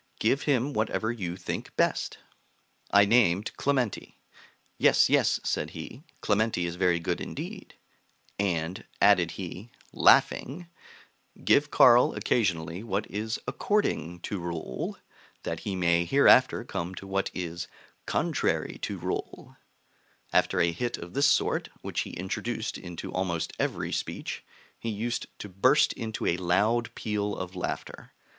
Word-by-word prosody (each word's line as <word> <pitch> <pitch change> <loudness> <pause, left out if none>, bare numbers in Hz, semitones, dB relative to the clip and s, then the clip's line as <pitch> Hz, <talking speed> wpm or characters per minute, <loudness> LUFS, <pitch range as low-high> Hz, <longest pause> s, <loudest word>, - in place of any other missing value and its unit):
Give 130 +6 +2
him 140 0 +1
whatever 110 0 0
you 90 -7 -4
think 90 - -5
best.' - - +1 0.7
I 100 0 +6
named 105 -3 +3
Clementi. 130 -6 -1 0.6
'Yes, - - +5
yes,' - - +3
said - - -1
he, 125 - -8 0.2
'Clementi 105 -3 +1
is 85 0 -4
very 90 -2 +2
good 85 - -2
indeed;' - - -7 0.6
and, 90 -2 -1 0.2
added - - +5
he, 105 +7 -7 0.2
laughing, 165 +7 +3 0.8
'Give 145 +1 +4
Carl 120 -3 +6
occasionally 85 -6 0
what 105 -2 -2
is 110 +2 -2
according 90 - -1
to 100 - -4
rule, 85 -7 -4 0.5
that 80 - -3
he 100 -2 -4
may 85 -1 +2
hereafter - - +5
come 90 +2 -4
to 95 - -8
what 95 0 -1
is 85 -1 -4 0.4
contrary - - 0
to - - -3
rule.' - - -5 0.8
After 95 - +3
a 85 0 +3
hit 120 +8 -3
of 85 +1 -9
this 140 +1 +4
sort, - - +1
which - - -3
he - - -3
introduced 110 +5 -3
into 90 -2 -7
almost 90 -3 -2
every - - -1
speech, - - -4 0.4
he 115 - -4
used 115 +3 -2
to - - -7
burst 125 +10 +3
into 110 -1 -4
a 85 - +2
loud 105 +7 +1
peal 105 -1 -2
of 95 0 -6
laughter. 90 - -5
100 Hz, 135 wpm, -28 LUFS, 85-115 Hz, 0.8 s, I